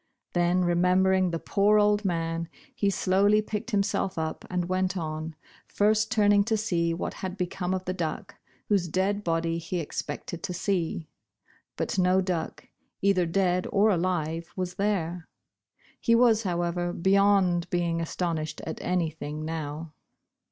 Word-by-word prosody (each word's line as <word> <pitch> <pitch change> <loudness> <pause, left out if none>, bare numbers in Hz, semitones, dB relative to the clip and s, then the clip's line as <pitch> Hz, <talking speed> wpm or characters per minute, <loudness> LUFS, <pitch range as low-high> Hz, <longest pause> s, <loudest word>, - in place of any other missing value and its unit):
Then, 175 +1 +2
remembering 185 +2 +3
the 170 - -2
poor 205 +5 +2
old 210 0 +3
man, 165 -2 -2 0.2
he 200 - +1
slowly 200 +2 +3
picked 215 +1 -4
himself 200 -3 0
up, 160 0 -3
and 180 -1 -1
went 185 +1 0
on, 155 -1 -4 0.3
first 215 +1 +2
turning 205 -3 +4
to 220 0 +1
see 170 -6 0
what 165 - -3
had 190 0 -6
become 180 0 -2
of 185 0 -5
the 185 - -2
duck, 170 -4 -4 0.3
whose 195 -4 +2
dead 195 +4 0
body 165 -1 0
he 170 +2 -3
expected 165 +1 -5
to 200 -2 -4
see. 170 -4 -1 0.7
But - - -1
no 185 +1 +4
duck, 180 -4 -3 0.4
either 190 -3 +3
dead 180 +1 +1
or 210 +2 +4
alive, 170 -2 -1
was 185 -1 -3
there. 180 -4 -1 0.7
He 230 - +3
was, 230 -2 +5
however, 175 -2 -1
be 190 +3 0
yond 195 -3 +3
being 170 -1 0
astonished 165 -2 -3
at 160 - -6
anything 160 -3 -2
now. 155 0 -5
180 Hz, 145 wpm, -27 LUFS, 165-200 Hz, 0.7 s, was